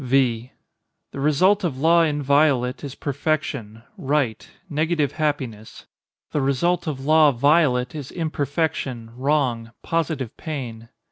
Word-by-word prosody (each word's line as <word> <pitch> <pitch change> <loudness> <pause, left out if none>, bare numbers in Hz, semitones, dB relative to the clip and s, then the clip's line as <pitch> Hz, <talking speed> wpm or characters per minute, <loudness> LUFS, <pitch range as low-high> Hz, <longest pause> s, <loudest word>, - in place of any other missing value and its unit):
V. 125 -2 +1 0.6
The - - -7
result 185 +9 +3
of 155 -7 -1
law 165 +4 +4
inviolate 145 -4 +2
is 140 -2 -6
perfection—right—negative 145 - -2
happiness. 130 -9 -3 0.5
The 150 - 0
result 160 +6 +1
of 135 -3 -4
law 155 0 +6
violate 130 -1 +2
is 145 -4 -6
imperfection, 145 -7 -2
wrong, 130 -4 0
positive 160 -7 -2
pain. 120 -7 -6
140 Hz, 105 wpm, -23 LUFS, 125-155 Hz, 0.6 s, law